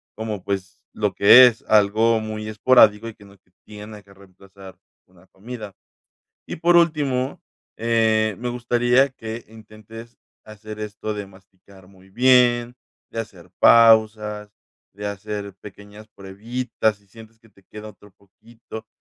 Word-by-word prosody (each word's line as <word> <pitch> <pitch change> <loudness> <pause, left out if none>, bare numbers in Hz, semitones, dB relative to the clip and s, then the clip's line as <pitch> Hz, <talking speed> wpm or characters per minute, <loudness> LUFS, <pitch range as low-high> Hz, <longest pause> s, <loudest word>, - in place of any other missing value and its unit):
como, 110 -3 -6
pues, 95 -1 -6
lo 105 -2 -2
que 120 +7 +8
es, 115 -2 -3
algo 110 +2 +3
muy 110 0 -7
esporádico 110 -1 +3
y 115 - -8
que 105 - -19
no 100 0 -19
te 90 -1 -40 0.2
tiene 105 0 -11
que 100 - -22
reemplazar 95 0 -17 0.3
una 90 0 -24
comida. 105 +1 -10 0.8
Y, - - -6
por 175 +2 +2
último, 145 -6 0 0.4
eh, 110 -1 +1
me 125 - -5
gustaría 120 +2 +1
que 115 -2 -9
intentes 110 +1 -14 0.3
hacer 110 0 -11
esto 105 0 -6
de 105 -1 -7
masticar 95 0 -21
muy 95 0 -21
bien, 120 +1 +3 0.4
de 115 - -3
hacer 95 -6 -12
pausas, 110 -2 +4 0.4
de 105 +1 -7
hacer 100 -1 -6
pequeñas 105 +1 -14
pruebitas, 110 +3 -4
si 100 0 -30
sientes 110 +2 -17
que 115 0 -24
te 100 - -26
queda 105 +3 -11
otro 105 0 -17
poquito. 110 +3 -14
110 Hz, 140 wpm, -21 LUFS, 100-115 Hz, 0.8 s, que